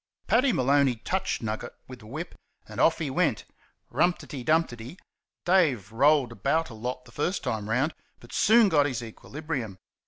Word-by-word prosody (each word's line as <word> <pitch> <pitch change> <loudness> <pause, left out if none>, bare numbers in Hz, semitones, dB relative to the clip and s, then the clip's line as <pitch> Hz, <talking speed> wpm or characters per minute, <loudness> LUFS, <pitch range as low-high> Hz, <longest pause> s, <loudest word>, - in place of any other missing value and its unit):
Paddy 255 +3 +3
Maloney 135 - +3
touched 190 +7 -2
Nugget 110 0 -4
with 130 -1 -10
the 110 - -14
whip, 155 +9 -6 0.3
and - - -8
off 160 - +4
he 150 -5 -3
went - - 0 0.5
"rump 175 0 +2
ti - - -12
dee, 135 -6 -7
dump 160 +5 +2
ti 120 - -8
dee." 120 +10 -10 0.5
Dave 145 - +2
rolled 140 +1 +3
about 150 +5 -1
a - - -9
lot 125 +3 -5
the - - -16
first 175 +6 -2
time 110 -1 -3
round, 135 +8 +1 0.3
but 120 - -15
soon 225 0 +5
got 145 -6 +3
his 125 -4 -4
equilibrium. 130 - -6
140 Hz, 185 wpm, -27 LUFS, 120-165 Hz, 0.5 s, soon